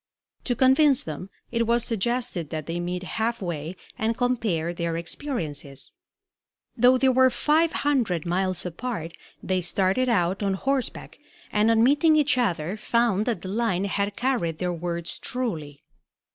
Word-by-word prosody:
To 245 - +1
convince 270 +2 +4
them 160 +4 -6 0.2
it 230 -1 0
was 235 0 +3
suggested 230 - -1
that 155 -2 -4
they 165 +2 -3
meet 180 +1 -3
half 225 +5 -2
way 170 -3 -4 0.2
and 225 +1 0
compare 215 -10 0
their 170 -1 -2
experiences. 165 - -4 0.8
Though 250 +2 +5
they 265 +1 +3
were 260 0 +5
five 310 +6 +2
hundred 235 - 0
miles 185 +1 0
apart, 180 -2 -5 0.3
they 185 -1 0
started 190 +8 +1
out 185 -3 +1
on 195 -1 +1
horseback, 270 +4 -3 0.3
and 210 +1 +3
on 225 0 +4
meeting 295 +5 +4
each 295 -2 +3
other 185 -4 -1
found 225 -2 +1
that 225 -8 -1
the 185 - -5
line 200 -3 0
had 200 +1 -1
carried 240 -11 -1
their 180 0 -1
words 170 0 -4
truly. 160 - -4
205 Hz, 150 wpm, -25 LUFS, 175-245 Hz, 0.8 s, Though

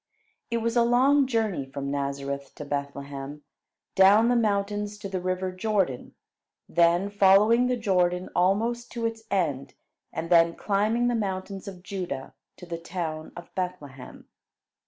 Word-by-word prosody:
It 235 -1 -1
was 230 +1 0
a 240 - +5
long 260 +4 +4
journey 220 - 0
from 140 +1 -5
Nazareth 140 0 -4
to 150 - -7
Bethlehem; 140 0 -5 0.5
down 205 +4 +6
the 245 - +3
mountains 205 -1 0
to 205 - -6
the 190 -2 -3
river 185 +1 -2
Jordan, 185 - -1 0.5
then 175 +4 +3
following 205 +5 +5
the 250 0 0
Jordan 180 -4 +1
almost 225 +6 +1
to 235 -1 -3
its 225 0 -3
end, 145 -9 -1 0.4
and 165 +1 -5
then 170 -1 +5
climbing 215 +4 +1
the 245 - +1
mountains 195 -3 -3
of 185 -2 -9
Judah 180 -9 -5 0.2
to - - -10
the 170 -1 -5
town 165 -2 -5
of 175 0 -11
Bethlehem. 150 -8 -6
190 Hz, 145 wpm, -26 LUFS, 160-215 Hz, 0.5 s, down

